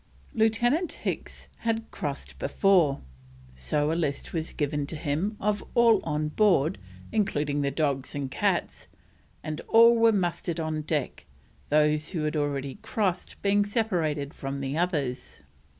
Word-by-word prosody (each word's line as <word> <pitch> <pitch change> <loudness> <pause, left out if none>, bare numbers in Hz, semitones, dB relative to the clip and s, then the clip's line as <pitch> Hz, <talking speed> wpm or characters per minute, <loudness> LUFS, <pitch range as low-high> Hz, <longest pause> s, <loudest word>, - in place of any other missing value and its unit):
Lieutenant 240 - +2
Hicks - - -5
had 225 -1 -2
crossed 140 -1 -5
before, 160 -2 +3 0.5
so 145 - 0
a - - +1
list 155 -5 -2
was 165 -1 -2
given 145 -1 -2
to 160 - -5
him 165 +7 -2
of 205 0 0
all 230 -3 +6
on 150 0 -1
board, 175 -3 +2 0.3
including 150 -9 0
the 140 - +1
dogs 140 -2 -1
and 140 -2 -3
cats, - - -1 0.6
and 155 0 -4
all 230 +1 +7
were 230 0 +5
mustered 175 -3 -1
on 155 -1 -2
deck, 150 - -3 0.4
those 150 +1 +2
who 165 -5 -3
had 150 +1 -1
already 140 0 -2
crossed 190 -5 -2
being 205 0 +3
separated 170 - -1
from 135 0 -5
the 135 +1 -3
others. 150 -7 -2
155 Hz, 140 wpm, -27 LUFS, 145-205 Hz, 0.6 s, all